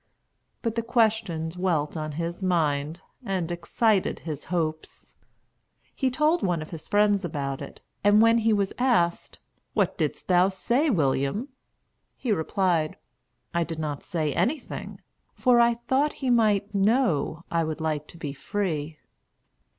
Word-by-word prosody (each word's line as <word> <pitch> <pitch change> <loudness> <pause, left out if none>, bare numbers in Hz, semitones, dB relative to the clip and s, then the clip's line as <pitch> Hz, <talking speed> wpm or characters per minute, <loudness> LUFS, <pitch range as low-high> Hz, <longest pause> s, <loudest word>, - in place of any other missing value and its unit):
But 230 -3 0
the 230 - -1
question 220 -8 +1
dwelt 170 -4 -1
on 155 -1 -4
his 170 +4 -4
mind 160 -3 0 0.2
and 185 -6 -2
excited 195 +4 +1
his 155 -3 -6
hopes. 160 -3 -3 0.8
He 265 - +1
told 305 +6 +2
one 175 -3 0
of 155 - -13
his 160 -2 -8
friends 205 -1 +3
about 140 -5 -3
it, - - -9 0.2
and 205 +1 +6
when 230 +1 +5
he 225 0 +2
was 200 -2 +1
asked, 230 -10 +1 0.4
"What - - +1
didst - - -2
thou 180 +1 +4
say, 235 - +1
William?" 145 - 0 0.7
he 245 - -3
replied, 170 -3 +1 0.6
"I 170 0 +2
did 165 -1 -5
not 150 -3 -3
say 155 -4 -2
anything; 275 +1 -2 0.3
for 245 -1 +4
I 235 0 +5
thought 265 +5 0
he 260 -3 -1
might 210 -3 +2
know 195 - +1
I 170 -1 +2
would 155 -1 -3
like 155 -1 -2
to 170 - -13
be 145 -4 -5
free." 155 -2 -3
180 Hz, 145 wpm, -26 LUFS, 160-225 Hz, 0.8 s, and